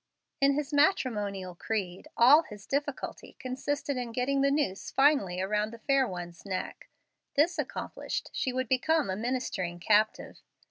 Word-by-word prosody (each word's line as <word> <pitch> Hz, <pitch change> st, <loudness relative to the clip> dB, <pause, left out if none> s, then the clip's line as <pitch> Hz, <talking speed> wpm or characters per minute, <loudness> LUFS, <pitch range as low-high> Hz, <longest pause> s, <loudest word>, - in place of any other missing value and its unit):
In 275 Hz, 0 st, +4 dB
his 295 Hz, 0 st, -3 dB
matrimonial 210 Hz, -, +1 dB
creed 190 Hz, -, -4 dB
all 270 Hz, +7 st, +8 dB
his 210 Hz, -10 st, -12 dB
difficulty 285 Hz, -1 st, -3 dB
consisted 280 Hz, +2 st, -3 dB
in 240 Hz, -2 st, -4 dB
getting 270 Hz, +3 st, +1 dB
the 275 Hz, -, +4 dB
noose 280 Hz, -10 st, -1 dB
finally 270 Hz, -11 st, +3 dB
around 210 Hz, +3 st, 0 dB
the 230 Hz, -, -9 dB
fair 270 Hz, +2 st, +2 dB
one's 175 Hz, -3 st, -7 dB
neck: 190 Hz, -2 st, -5 dB, 0.5 s
this 330 Hz, +3 st, +3 dB
accomplished, 285 Hz, -, -4 dB
she 260 Hz, -, -1 dB
would 255 Hz, 0 st, -2 dB
become 280 Hz, 0 st, +2 dB
a -, -, -1 dB
ministering 210 Hz, -7 st, -2 dB
captive. 215 Hz, +4 st, +1 dB
250 Hz, 145 wpm, -29 LUFS, 200-280 Hz, 0.5 s, all